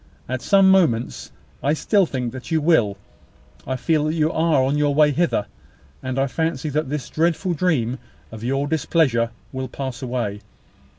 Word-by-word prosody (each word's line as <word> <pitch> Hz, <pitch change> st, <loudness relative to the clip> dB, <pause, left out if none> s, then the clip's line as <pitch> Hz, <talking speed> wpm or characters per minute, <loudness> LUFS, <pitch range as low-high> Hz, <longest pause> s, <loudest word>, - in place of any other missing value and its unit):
At 130 Hz, 0 st, -3 dB
some 195 Hz, -1 st, +5 dB
moments 145 Hz, -12 st, +1 dB, 0.3 s
I 145 Hz, -, +2 dB
still 195 Hz, +4 st, +2 dB
think 125 Hz, -5 st, -3 dB
that 130 Hz, -1 st, -8 dB
you 160 Hz, -2 st, +2 dB
will 145 Hz, -11 st, +2 dB, 0.7 s
I 130 Hz, -, -1 dB
feel 150 Hz, +3 st, +1 dB
that 155 Hz, +1 st, -1 dB
you 155 Hz, 0 st, +1 dB
are 160 Hz, -4 st, +2 dB
on 135 Hz, +2 st, +1 dB
your 145 Hz, -1 st, +1 dB
way 150 Hz, 0 st, +5 dB
hither, 155 Hz, -8 st, 0 dB, 0.6 s
and 130 Hz, 0 st, -4 dB
I 135 Hz, -, +2 dB
fancy 155 Hz, +1 st, -2 dB
that 150 Hz, -1 st, -1 dB
this 145 Hz, -3 st, -3 dB
dreadful 170 Hz, +3 st, 0 dB
dream 140 Hz, -8 st, 0 dB, 0.3 s
of 110 Hz, 0 st, -9 dB
your 135 Hz, +3 st, 0 dB
displeasure 145 Hz, -6 st, +1 dB, 0.2 s
will 130 Hz, -1 st, -4 dB
pass 130 Hz, -1 st, -6 dB
away. 120 Hz, -5 st, -3 dB
145 Hz, 170 wpm, -22 LUFS, 130-160 Hz, 0.7 s, some